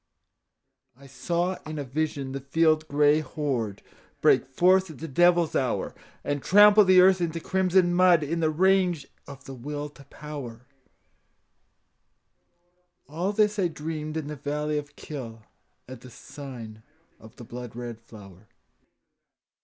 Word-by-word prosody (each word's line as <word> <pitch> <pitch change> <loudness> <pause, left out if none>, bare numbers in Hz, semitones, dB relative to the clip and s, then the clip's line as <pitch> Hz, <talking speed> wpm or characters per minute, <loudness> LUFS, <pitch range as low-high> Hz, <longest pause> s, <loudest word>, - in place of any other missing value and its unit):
I 140 - -17
saw 170 +8 -2
in 155 0 -7
a 145 - -3
vision 140 0 -3
the 135 - -4
field 155 +3 +1
gray 145 +1 +3
horde 130 -10 -4 0.4
Break - - +3
forth 185 +7 +3
at 155 - -10
the 165 - -7
devil's 175 +2 +3
hour, 125 -7 -1 0.3
And 145 -1 -2
trample 205 +4 +6
the 185 -1 +5
earth 185 0 +5
into 165 -1 -2
crimson 185 0 +1
mud 175 -3 +4
In 165 +3 -2
the 160 -1 +1
rage 180 -2 +2 0.2
of 140 -1 -11
the 135 - -8
Will 145 +4 -6
to 145 -1 -17
Power, 130 -7 -9 2.4
All 170 +7 -2
this 210 0 +1
I 185 - +2
dreamed 155 -1 -5
in 155 - -4
the 150 +1 -6
valley 150 +1 -2
of 145 -1 -11
Kyll, 115 -7 -8 0.4
At 130 -1 -10
the 125 - -12
sign 120 -4 -10 0.4
of 110 -1 -16
the - - -11
blood 120 0 -9
red 120 -2 -7
flower. 105 -3 -15
150 Hz, 145 wpm, -26 LUFS, 130-175 Hz, 2.4 s, trample